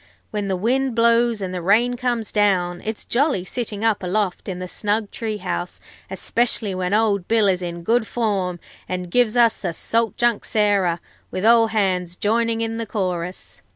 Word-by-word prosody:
When 210 -2 -2
the 190 - 0
wind 250 +6 0
blows 230 -1 +3
and 185 -1 -3
the 180 - -3
rain 225 +7 +3
comes 240 -3 -2
down, 185 -4 +1
it's 220 0 -5
jolly 260 - +1
sitting 220 0 -3
up 215 -2 +2
aloft 190 +1 -1
in 185 - -4
the 180 0 -5
snug 210 +2 -1
tree 220 -2 -3
house, 180 -2 -4 0.3
especially 230 -4 0
when 185 0 -2
old 205 -3 +1
Bill 225 -2 +3
is 185 -1 +1
in 170 -1 -5
good 225 +4 +1
form 195 -6 -1 0.3
and 180 -1 -4
gives 245 0 +2
us 230 -2 +5
the 175 -4 -3
Salt 225 +3 0
Junk 240 -2 +1
Sarah, 200 -5 +1 0.3
with 185 - -3
all 230 0 +6
hands 185 -5 0
joining 230 +3 0
in 225 0 -2
the 230 -1 -4
chorus. 180 -3 -4
210 Hz, 180 wpm, -22 LUFS, 185-230 Hz, 0.3 s, all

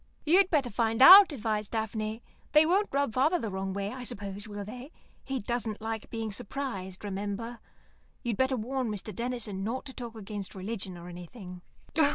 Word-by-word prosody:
"You'd 370 +5 +5
better 280 -7 +1
find 225 +1 0
out," 375 +7 +11
advised 215 -5 -2
Daphne. 220 0 -3 0.3
"They 305 +1 +7
won't 390 +5 +2
rub 280 -4 0
father 295 +8 +3
the 225 -10 -4
wrong 190 0 -3
way, 200 +1 -3
I 255 -1 -6
suppose, 205 -2 -6
will 205 -1 -6
they? 250 +7 -9 0.3
He 270 -1 -3
doesn't 230 -2 -2
like 220 0 -4
being 225 -2 -3
surprised, 195 -4 -5
remember. 205 +4 -4 0.6
You'd 235 -4 -1
better 260 0 +2
warn 250 +2 -2
Mr. 210 0 -5
Denison 230 -5 -3
not 240 +7 -3
to 265 - -8
talk 235 -3 -7
against 205 -2 -6
religion 190 -2 -5
or 170 0 -10
anything." 180 +1 -9
225 Hz, 175 wpm, -29 LUFS, 200-255 Hz, 0.6 s, out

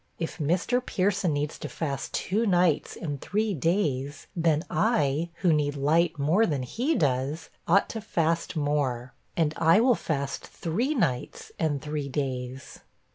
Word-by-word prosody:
If 165 +1 -4
Mr. 180 - +1
Pierson 195 -5 +1
needs 145 +1 -2
to - - -5
fast 140 -4 -3
two 215 +6 0
nights 175 -5 +2
and 145 -5 -5
three 210 +1 0
days, 150 -4 -1
then 165 -1 +2
I, 165 - +1
who 175 -3 +5
need 145 -1 +1
light 155 +4 +2
more 160 +11 +3
than 140 -5 -1
he 250 - -1
does, 145 +2 0 0.2
ought 190 +4 +4
to 225 - -4
fast 165 -4 0
more, 140 -4 -1 0.2
and 155 -3 +2
I 165 +5 +5
will 250 +2 +5
fast 140 -9 -2
three 235 - -1
nights 130 - -1
and 150 -4 0
three 150 -2 -3
days.' 130 -1 -4
160 Hz, 150 wpm, -27 LUFS, 140-180 Hz, 0.2 s, who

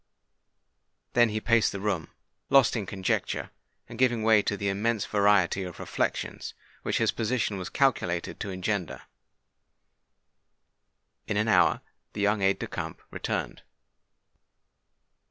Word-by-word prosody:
Then 120 -1 +5
he 110 0 -2
paced 115 0 +3
the 100 - -5
room—lost 105 - 0
in 105 -4 -3
conjecture, 95 -2 -2 0.4
and 115 - -10
giving 120 -3 +2
way 110 -1 +5
to 100 - -2
the 100 - -2
immense 105 +2 0
variety 100 -3 +3
of 90 -2 -7
reflections - - -3 0.3
which - - -1
his - - +2
position 110 -3 -1
was 90 - -5
calculated 90 -11 0
to 105 - -4
engender. 95 -1 -3 2.2
In 105 - -1
an 105 +1 +1
hour 110 - +4 0.3
the 105 - -4
young 105 0 +2
aide 95 0 +3
de - - -4
camp - - -6
returned. - - -3
105 Hz, 125 wpm, -27 LUFS, 95-115 Hz, 2.2 s, Then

